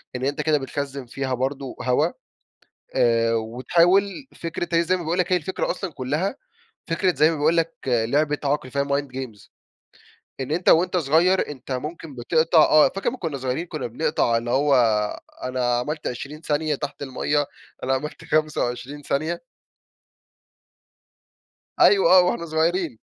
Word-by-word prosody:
إن 125 Hz, +1 st, -2 dB
أنت 145 Hz, +2 st, -1 dB
كده 150 Hz, 0 st, +2 dB
بتخزن 140 Hz, -1 st, -5 dB
فيها 130 Hz, +2 st, -3 dB
برضو 135 Hz, +1 st, -3 dB
هوا، 125 Hz, 0 st, +2 dB, 0.9 s
آآ، 115 Hz, -1 st, +3 dB
وتحاول 170 Hz, -, +1 dB
فكرة 170 Hz, +1 st, -4 dB
هي 170 Hz, -, +3 dB
زي 180 Hz, +2 st, +1 dB
ما 175 Hz, -, -6 dB
باقول 170 Hz, +3 st, -1 dB
لك 180 Hz, +1 st, 0 dB
هي 180 Hz, -, +5 dB
الفكرة 180 Hz, +3 st, -2 dB
أصلًا 185 Hz, -1 st, -5 dB
كلها، 150 Hz, -, -2 dB, 0.5 s
فكرة 175 Hz, +2 st, +1 dB
زي 155 Hz, +2 st, +4 dB
ما 160 Hz, -, -3 dB
باقول 160 Hz, +3 st, +2 dB
لك 165 Hz, 0 st, +1 dB
لعبة 140 Hz, +6 st, +1 dB
عقل 140 Hz, -2 st, -1 dB
فيها 140 Hz, 0 st, 0 dB
mind 140 Hz, 0 st, -1 dB
games، 120 Hz, -7 st, -7 dB, 0.9 s
إن 130 Hz, +1 st, -4 dB
أنت 175 Hz, +3 st, 0 dB
وأنت 180 Hz, +3 st, +4 dB
صغير 170 Hz, +4 st, +3 dB
أنت 135 Hz, -2 st, -7 dB
ممكن 150 Hz, +3 st, -5 dB
بِتِقطَع 160 Hz, +7 st, +2 dB
آه، 155 Hz, -2 st, +6 dB
فاكر 195 Hz, +7 st, -3 dB
لما 255 Hz, -, -3 dB
كنا 160 Hz, -8 st, -3 dB
صغيرين 130 Hz, +6 st, -2 dB
كُنا 155 Hz, -3 st, -4 dB
بنقطع 120 Hz, -1 st, 0 dB
اللي 120 Hz, +1 st, -2 dB
هو 140 Hz, +3 st, +3 dB, 0.7 s
أنا 125 Hz, -1 st, 0 dB
عملت 150 Hz, +5 st, -4 dB
20 135 Hz, +5 st, -7 dB
ثانية 155 Hz, -1 st, 0 dB
تحت 145 Hz, 0 st, -6 dB
المَيّة، 145 Hz, +2 st, 0 dB, 0.4 s
أنا 135 Hz, +1 st, +1 dB
عملت 150 Hz, +3 st, -5 dB
25 145 Hz, -2 st, -1 dB
ثانية؟ 155 Hz, +5 st, -2 dB, 2.4 s
أيوه 195 Hz, -4 st, +6 dB
آه، -, -, +7 dB
وإحنا 180 Hz, -1 st, -1 dB
صغيرين 160 Hz, -, 0 dB
150 Hz, 155 wpm, -23 LUFS, 130-165 Hz, 2.4 s, آه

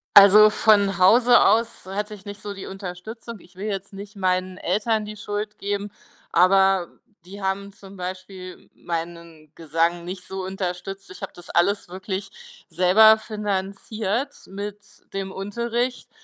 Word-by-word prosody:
Also, 205 Hz, +2 st, +9 dB
von 205 Hz, -2 st, +3 dB
Hause 235 Hz, +6 st, +6 dB
aus 230 Hz, -2 st, +2 dB
hatte 210 Hz, +3 st, -4 dB
ich 195 Hz, -, -17 dB
nicht 205 Hz, 0 st, -8 dB
so 205 Hz, -1 st, -5 dB
die 195 Hz, -, -8 dB
Unterstützung. 195 Hz, +4 st, -8 dB
Ich 180 Hz, +2 st, -20 dB
will 200 Hz, +3 st, -5 dB
jetzt 195 Hz, -1 st, -4 dB
nicht 200 Hz, +2 st, -9 dB
meinen 185 Hz, -1 st, -1 dB
Eltern 215 Hz, +4 st, 0 dB
die 215 Hz, 0 st, -7 dB
Schuld 210 Hz, +1 st, -5 dB
geben, 205 Hz, 0 st, -3 dB, 0.4 s
aber 190 Hz, 0 st, +4 dB, 0.4 s
die 200 Hz, +3 st, -10 dB
haben 200 Hz, +1 st, -2 dB
zum 195 Hz, 0 st, -14 dB
Beispiel 185 Hz, 0 st, -8 dB
meinen 165 Hz, -2 st, -6 dB
Gesang 165 Hz, +2 st, 0 dB
nicht 180 Hz, 0 st, -7 dB
so 190 Hz, -1 st, -5 dB
unterstützt. 190 Hz, +1 st, -5 dB
Ich -, -, -11 dB
habe -, -, -5 dB
das 175 Hz, -, -13 dB
alles 190 Hz, +2 st, +1 dB
wirklich 200 Hz, -, -7 dB
selber 190 Hz, +6 st, +6 dB
finanziert 210 Hz, +2 st, -3 dB
mit 200 Hz, +1 st, -6 dB, 0.3 s
dem 195 Hz, -1 st, -4 dB
Unterricht 235 Hz, +5 st, -3 dB
195 Hz, 145 wpm, -23 LUFS, 185-210 Hz, 0.4 s, Also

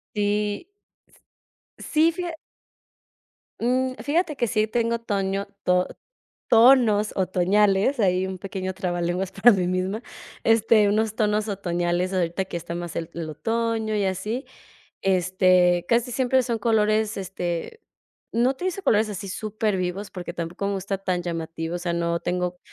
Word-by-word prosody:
Sí. 205 Hz, +1 st, 0 dB, 1.1 s
Sí, 320 Hz, +2 st, +2 dB
fija 345 Hz, -1 st, -4 dB, 1.3 s
Um, 255 Hz, +2 st, +1 dB
fíjate 310 Hz, 0 st, 0 dB
que 240 Hz, -, +1 dB
sí 215 Hz, -1 st, +1 dB
tengo 230 Hz, +1 st, 0 dB
toño 195 Hz, -3 st, -2 dB, 0.2 s
to 180 Hz, 0 st, +2 dB, 0.6 s
tonos 225 Hz, -3 st, +5 dB
otoñales, 195 Hz, +6 st, +2 dB
ahí 185 Hz, -2 st, +2 dB
un 190 Hz, 0 st, -5 dB
pequeño 190 Hz, 0 st, -4 dB
trabalenguas 180 Hz, 0 st, -2 dB
para 215 Hz, +5 st, +6 dB
mí 185 Hz, -3 st, 0 dB
misma. 185 Hz, +5 st, -1 dB, 0.4 s
Este, 225 Hz, -1 st, +4 dB
unos 215 Hz, +1 st, +1 dB
tonos 215 Hz, 0 st, +1 dB
otoñales 175 Hz, -1 st, -1 dB
ahorita 180 Hz, +1 st, 0 dB
que 175 Hz, -, -5 dB
está 170 Hz, 0 st, -5 dB
más 175 Hz, -1 st, -5 dB
el 165 Hz, 0 st, -4 dB
el 165 Hz, -2 st, -4 dB
otoño 225 Hz, +7 st, -1 dB
y 205 Hz, -, +1 dB
así. 210 Hz, +7 st, -2 dB, 0.6 s
Este, 185 Hz, -1 st, +3 dB
casi 240 Hz, +1 st, +2 dB
siempre 260 Hz, +1 st, +2 dB
son 235 Hz, -2 st, -2 dB
colores, 215 Hz, -1 st, +2 dB
este, 180 Hz, -, -4 dB, 0.5 s
no 240 Hz, +3 st, +3 dB
utilizo 365 Hz, +7 st, -3 dB
colores 215 Hz, 0 st, +3 dB
así 200 Hz, 0 st, -6 dB
supervivos, 200 Hz, -2 st, -2 dB
porque 175 Hz, -2 st, -6 dB
tampoco 175 Hz, +3 st, -4 dB
me 200 Hz, -, -1 dB
gusta 195 Hz, 0 st, -3 dB
tan 185 Hz, -2 st, -1 dB
llamativo. 165 Hz, -1 st, -4 dB
O -, -, -4 dB
sea, 175 Hz, 0 st, -2 dB
no 170 Hz, 0 st, -1 dB
tengo, 180 Hz, 0 st, -2 dB
200 Hz, 140 wpm, -24 LUFS, 180-225 Hz, 1.3 s, para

